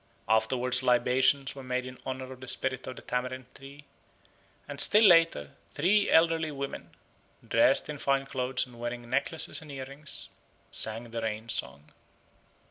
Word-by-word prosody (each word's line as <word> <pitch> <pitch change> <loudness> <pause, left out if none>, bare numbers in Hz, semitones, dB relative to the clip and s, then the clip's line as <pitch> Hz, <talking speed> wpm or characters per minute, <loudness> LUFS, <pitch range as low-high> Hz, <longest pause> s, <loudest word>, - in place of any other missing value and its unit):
Afterwards 125 +3 +2
libations 130 +2 +3
were 135 - -9
made 125 0 -3
in 130 0 -10
honour 130 0 -5
of 130 - -15
the 130 - -10
spirit 130 +1 -1
of 130 - -6
the - - -12
tamarind 125 +1 -3
tree; 140 +2 -13 0.8
and 145 0 -3
still 210 +8 +6
later 165 - +5 0.2
three 200 +7 +2
elderly 165 -1 +3
women, 140 -2 -7 0.5
dressed - - +3
in 150 -2 -6
fine 135 0 +1
clothes 130 -1 -1
and 120 -2 -15
wearing 120 0 -5
necklaces 140 +7 0
and 155 -2 -11
earrings, 140 +2 -5 0.4
sang 115 +2 -2
the 115 0 -4
Rain 110 +1 -4
Song. 70 - -4
130 Hz, 150 wpm, -29 LUFS, 125-140 Hz, 0.8 s, still